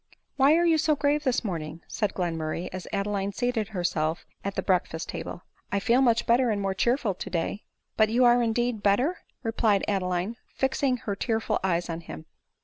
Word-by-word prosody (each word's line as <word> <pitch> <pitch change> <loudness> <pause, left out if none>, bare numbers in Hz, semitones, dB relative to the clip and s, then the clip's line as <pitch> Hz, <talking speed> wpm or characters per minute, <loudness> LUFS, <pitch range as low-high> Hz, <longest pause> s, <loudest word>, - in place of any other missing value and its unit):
" - - -50
Why 280 +3 +5
are 340 +1 +3
you 325 -2 +4
so 305 0 +3
grave 295 +1 +1
this 255 -1 +1
morning 165 -5 -4
?" - - -38
said 210 -3 -2
Glen 175 -3 -1
murray. 160 +2 -3
as 185 -1 -6
Adeline 200 0 -1
seated 245 -3 -1
herself 170 -5 -1 0.2
at 200 0 -3
the - - -1
breakfast 180 -3 0
ta - - -4
ble 175 - -7
;— - - -37
" - - -41
I 200 - +1
feel 240 +5 +3
much 235 -3 +3
better 240 +1 +3
and 210 -2 0
more 195 -1 -1
cheerful 235 +1 +1
to 185 - -7
day." 175 +4 -2
* - - -53
" - - -51
But 220 -1 +4
are - - -4
you,, 245 +2 +4
indeed, 240 -1 +2
better 245 - +2
?" - - -48
replied 225 -3 +2
Adeline, 185 +2 -1 0.2
fixing 265 -1 +1
her 205 -4 -4
tearful 225 +1 0
eyes 175 -2 +1
on 165 0 -4
him. 80 - -9
210 Hz, 230 wpm, -27 LUFS, 180-245 Hz, 0.2 s, Why